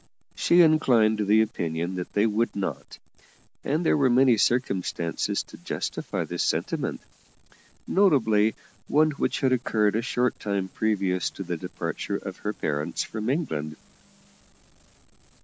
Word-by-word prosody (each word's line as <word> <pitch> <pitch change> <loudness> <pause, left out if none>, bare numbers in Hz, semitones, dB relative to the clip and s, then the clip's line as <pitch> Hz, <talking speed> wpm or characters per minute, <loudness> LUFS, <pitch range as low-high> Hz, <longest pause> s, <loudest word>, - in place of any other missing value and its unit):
She 175 +1 +4
inclined 120 -9 +3
to 105 - 0
the 110 +2 +5
opinion 85 -4 -3
that 90 - -6
they 105 +1 +3
would 115 +2 0
not, 100 -2 -5 0.7
and 155 +5 -1
there - - +4
were 140 -3 +3
many 125 0 +5
circumstances 100 -7 0
to - - -14
justify - - -4
this - - -4
sentiment, - - -1 0.8
notably 110 - +3 0.3
one 155 +1 +3
which 140 - -2
had 130 -1 +3
occurred 110 -4 +1
a 115 - +1
short 125 0 -1
time 100 -2 -2
previous 95 -4 0
to 95 - -7
the 90 -1 -3
departure 80 - -4
of - - -8
her - - -3
parents 75 0 -2
from 110 +1 -4
England. 80 - -2
110 Hz, 135 wpm, -26 LUFS, 95-130 Hz, 0.8 s, the